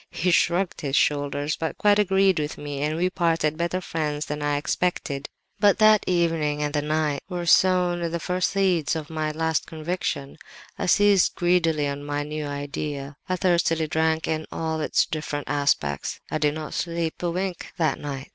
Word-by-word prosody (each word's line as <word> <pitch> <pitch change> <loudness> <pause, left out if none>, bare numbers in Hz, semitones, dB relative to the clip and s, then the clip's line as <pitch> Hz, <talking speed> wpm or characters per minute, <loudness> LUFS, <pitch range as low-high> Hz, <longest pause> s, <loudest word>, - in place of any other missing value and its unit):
He 180 +2 0
shrugged 175 +2 +1
his 140 -3 -1
shoulders, 145 0 +1
but 160 - -4
quite 210 -4 +4
agreed 195 -3 +3
with 150 0 -3
me; 145 -1 -5
and 150 +2 -1
we 180 +2 +2
parted 165 -4 +1
better 170 +3 -1
friends 155 -4 -3
than 150 0 -4
I 145 0 0
had - - +1
expected. 145 -3 -2 0.3
"But 205 -1 +5
that 215 -1 +6
evening 165 -4 +1
and 145 0 -2
that 145 -1 0
night 150 -2 0
were 175 -2 -3
sown 175 -1 +3
the 170 +1 -3
first 180 +2 0
seeds 185 -6 +1
of 155 -1 -5
my 155 -1 -1
'last 160 0 -1
conviction.' 155 -3 -4 0.4
I - - -3
seized 200 0 +4
greedily 165 -4 +2
on 140 0 -4
my 145 0 -2
new 150 0 -4
idea; 145 0 -5
I 185 - +1
thirstily 170 -3 +2
drank 160 +1 0
in 155 0 -2
all 160 -1 -2
its - - +2
different 150 -2 -4
aspects 140 - 0
(I 155 - -1
did 150 -1 +1
not 155 -1 -6
sleep 170 -1 -2
a 175 - 0
wink 180 +1 -3
that 160 -3 +1
night!) 140 -2 -6
160 Hz, 185 wpm, -24 LUFS, 145-175 Hz, 0.4 s, that